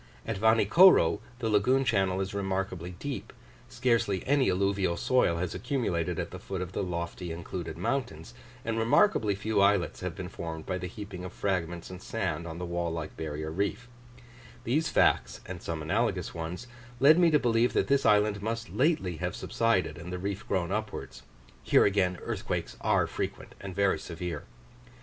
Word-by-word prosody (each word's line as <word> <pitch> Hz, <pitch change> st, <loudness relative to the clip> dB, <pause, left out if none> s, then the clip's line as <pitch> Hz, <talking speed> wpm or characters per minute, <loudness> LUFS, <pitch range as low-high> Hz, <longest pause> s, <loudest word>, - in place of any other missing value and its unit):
At 110 Hz, -3 st, -3 dB
Vanikoro, 110 Hz, -, +6 dB, 0.2 s
the 120 Hz, -3 st, -2 dB
lagoon 125 Hz, +6 st, +3 dB
channel 95 Hz, -4 st, +1 dB
is 95 Hz, 0 st, -3 dB
remarkably 95 Hz, -3 st, -3 dB
deep, 140 Hz, +6 st, -5 dB, 0.4 s
scarcely 115 Hz, -6 st, +1 dB
any 135 Hz, -4 st, +3 dB
alluvial 95 Hz, -1 st, +1 dB
soil 125 Hz, -9 st, +2 dB
has 90 Hz, 0 st, -2 dB
accumulated 110 Hz, -, -1 dB
at -, -, -3 dB
the -, -, -7 dB
foot 95 Hz, -2 st, -5 dB
of 90 Hz, 0 st, -4 dB
the -, -, -2 dB
lofty 85 Hz, -1 st, -4 dB
included 85 Hz, -1 st, -5 dB
mountains, 85 Hz, -, -3 dB, 0.3 s
and 115 Hz, 0 st, -1 dB
remarkably 115 Hz, -, +3 dB
few 100 Hz, +1 st, 0 dB
islets 100 Hz, -3 st, +2 dB
have 90 Hz, -3 st, -4 dB
been 90 Hz, -, -5 dB
formed 80 Hz, -3 st, -6 dB
by 95 Hz, -1 st, -2 dB
the 90 Hz, -, -4 dB
heaping 95 Hz, -1 st, -8 dB
of 90 Hz, -, -6 dB
fragments 85 Hz, -4 st, -2 dB
and 90 Hz, -, -9 dB
sand 85 Hz, +3 st, -3 dB
on 80 Hz, 0 st, -6 dB
the 90 Hz, -, -4 dB
wall 85 Hz, -1 st, -2 dB
like 80 Hz, -1 st, -5 dB
barrier 80 Hz, 0 st, -4 dB
reef; 100 Hz, +7 st, -2 dB, 0.8 s
these 150 Hz, +8 st, +1 dB
facts, -, -, +2 dB
and 90 Hz, -1 st, -7 dB
some 80 Hz, -2 st, -4 dB
analogous 95 Hz, 0 st, 0 dB
ones, 85 Hz, +6 st, -5 dB, 0.3 s
led 155 Hz, +6 st, +7 dB
me 175 Hz, -2 st, +6 dB
to 155 Hz, -, +5 dB
believe 120 Hz, -2 st, +2 dB
that -, -, +2 dB
this 140 Hz, 0 st, +2 dB
island 105 Hz, -1 st, +3 dB
must 115 Hz, +2 st, -3 dB
lately 130 Hz, -, +1 dB
have 90 Hz, +4 st, -3 dB
subsided 95 Hz, -9 st, 0 dB
and 90 Hz, +2 st, -7 dB
the 90 Hz, -, -3 dB
reef 100 Hz, +3 st, -4 dB
grown 90 Hz, -2 st, 0 dB
upwards: 110 Hz, 0 st, -4 dB, 0.4 s
here -, -, +4 dB
again 95 Hz, -3 st, +2 dB
earthquakes -, -, -3 dB
are -, -, +3 dB
frequent -, -, -5 dB
and 95 Hz, -2 st, -7 dB
very 100 Hz, -1 st, +2 dB
severe. 85 Hz, -2 st, -5 dB
95 Hz, 175 wpm, -29 LUFS, 85-115 Hz, 0.8 s, led